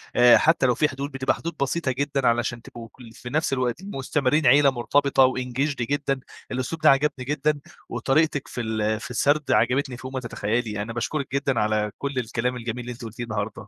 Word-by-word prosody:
آآ 120 0 +7
حتى 160 -4 +3
لو 125 -2 +3
في 150 - +2
حدود 140 +2 -5
بتبقى 135 0 0
حدود 170 0 -6
بسيطة 140 0 0
جدًا؛ 140 0 -1
علشان 120 0 +1
تبقوا- 115 -1 -10 0.3
في 125 - -6
نفس 155 0 0
الوقت- 130 +6 -1
مستمرين 135 +1 +1
عيلة 140 +2 +6
مرتبطة 135 +2 +2
وEngaged 130 +3 -2
جدًا، 135 +2 -1 0.3
الأسلوب 130 +5 -3
ده 155 - +6
عجبني 140 -1 +2
جدًا 150 +1 0 0.3
وطريقتِك 145 +1 +1
في 120 - -5
ال 110 -1 -1
في 140 -1 -8
السرد 145 +4 +1
عجبتني 130 -1 +2
فوق 130 +1 -8
ما 130 - -1
تتخيلي. 110 -2 -2
أنا 115 +2 -5
باشكرِك 130 +3 -3
جدًا 135 -2 0
على 105 0 0
كل 140 0 -3
الكلام 125 +1 -2
الجميل 120 0 -4
اللي 125 - -5
أنت 120 0 -9
قلتيه 115 +2 -6
النهارده 110 -1 -4
130 Hz, 190 wpm, -24 LUFS, 120-140 Hz, 0.3 s, آآ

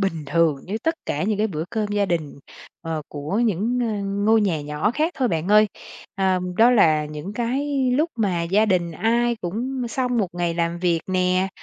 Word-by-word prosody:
bình 165 -6 -1
thường 165 0 +2
như 200 +4 -3
tất 325 0 +1
cả 150 - -1
những 210 +1 0
cái 215 - +2
bữa 160 -6 -4
cơm 220 -2 -1
gia 205 -1 0
đình, 155 -6 -3 0.4
ờ, 165 -2 -4
của 150 +8 -3
những, 225 +4 0
ơ, 215 -4 -2 0.2
ngôi 220 +1 +5
nhà 185 -7 0
nhỏ 150 +7 -1
khác 305 +7 0
thôi 260 -4 +1
bạn 165 0 -2
ơi. 210 +1 +6 0.5
Ờ, 190 -1 +1 0.2
đó 230 +2 +6
là 155 -10 +4
những 150 +6 -7
cái 260 +4 -1
lúc 315 +4 +1
mà 190 -7 0
gia 195 +6 +2
đình 175 -4 +1
ai 235 +6 +1
cũng 240 +7 -3
xong 250 +1 -1
một 200 -4 +1
ngày 175 -1 -1
làm 170 0 -1
việc 170 -2 +1
nè, 185 0 +1
195 Hz, 200 wpm, -23 LUFS, 170-230 Hz, 0.5 s, ơi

